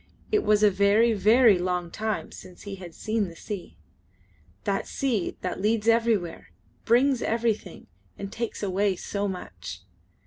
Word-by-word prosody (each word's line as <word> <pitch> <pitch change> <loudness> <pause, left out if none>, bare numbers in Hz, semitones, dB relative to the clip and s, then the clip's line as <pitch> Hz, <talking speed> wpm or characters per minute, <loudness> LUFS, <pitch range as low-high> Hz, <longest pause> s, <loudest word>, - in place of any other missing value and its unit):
It 425 -1 +3
was 210 0 +3
a 210 - +6
very, 205 +4 +4
very 215 0 +5
long 180 -1 -2
time 220 +2 -3
since 180 - -12
he 200 -1 -6
had 175 -3 -10
seen 215 -2 -1
the 170 - -10
sea 200 +1 -7 0.9
that - - -1
sea 240 -9 -1
that 185 0 -3
leads 215 +1 +1
everywhere, 230 -7 +1 0.4
brings 250 +2 +3
everything, 230 -1 -1 0.3
and 200 0 -6
takes 230 -2 -4
away 195 0 +1
so 200 +3 -3
much. 185 -2 -7
210 Hz, 145 wpm, -26 LUFS, 190-230 Hz, 0.9 s, a